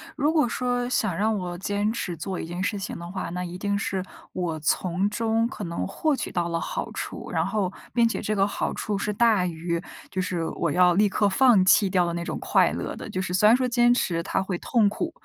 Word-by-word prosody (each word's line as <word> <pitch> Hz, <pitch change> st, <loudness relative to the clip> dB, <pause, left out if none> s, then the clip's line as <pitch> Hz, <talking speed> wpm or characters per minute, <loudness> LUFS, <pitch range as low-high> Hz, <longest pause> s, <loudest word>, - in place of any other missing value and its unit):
如 295 Hz, +3 st, +2 dB
果 310 Hz, -5 st, +3 dB
说 245 Hz, 0 st, -1 dB
想 215 Hz, -8 st, 0 dB
让 215 Hz, +1 st, +1 dB
我 175 Hz, -2 st, -4 dB
坚 205 Hz, +3 st, -1 dB
持 190 Hz, -6 st, -3 dB
做 180 Hz, +3 st, -4 dB
一 -, -, -4 dB
件 175 Hz, +2 st, -5 dB
事 205 Hz, +1 st, -1 dB
情 195 Hz, +1 st, -5 dB
的 170 Hz, 0 st, -7 dB
话， 190 Hz, +1 st, -4 dB
那 180 Hz, +1 st, -3 dB
一 180 Hz, 0 st, -6 dB
定 200 Hz, +1 st, -1 dB
是 190 Hz, -2 st, -2 dB, 0.3 s
我 170 Hz, -4 st, -2 dB
从 180 Hz, +5 st, 0 dB
中 225 Hz, +1 st, +1 dB
可 235 Hz, -, -7 dB
能 170 Hz, 0 st, -3 dB
获 305 Hz, +9 st, 0 dB
取 -, -, -4 dB
到 175 Hz, -1 st, -1 dB
了 165 Hz, 0 st, -1 dB
好 -, -, -4 dB
处。 -, -, -6 dB
然 -, -, +1 dB
后 200 Hz, -4 st, -1 dB, 0.2 s
并 235 Hz, -1 st, +4 dB
且 230 Hz, -, -2 dB
这 215 Hz, -, -1 dB
个 195 Hz, -, +3 dB
好 200 Hz, -, -2 dB
处 210 Hz, -1 st, -2 dB
是 210 Hz, -, -1 dB
大 215 Hz, -3 st, +3 dB
于， 170 Hz, 0 st, -3 dB, 0.3 s
就 185 Hz, -, -1 dB
是 180 Hz, -2 st, -2 dB
我 165 Hz, -, -1 dB
要 180 Hz, +2 st, +5 dB
立 205 Hz, +3 st, +3 dB
刻 205 Hz, +2 st, +2 dB
放 220 Hz, -1 st, +5 dB
弃 195 Hz, +1 st, +5 dB
掉 185 Hz, -1 st, +2 dB
的 170 Hz, -, -2 dB
那 170 Hz, -, -3 dB
种 -, -, -4 dB
快 -, -, +3 dB
乐 -, -, -4 dB
的。 -, -, -8 dB
就 185 Hz, -, -3 dB
是 180 Hz, -1 st, -3 dB
虽 190 Hz, +3 st, +5 dB
然 225 Hz, -, +7 dB
说 255 Hz, -1 st, 0 dB
坚 240 Hz, 0 st, +4 dB
持 170 Hz, -8 st, 0 dB
它 190 Hz, -, -1 dB
会 185 Hz, -2 st, -3 dB
痛 230 Hz, -5 st, +2 dB
苦， 330 Hz, +11 st, -2 dB
195 Hz, 265 characters per minute, -25 LUFS, 180-220 Hz, 0.3 s, 然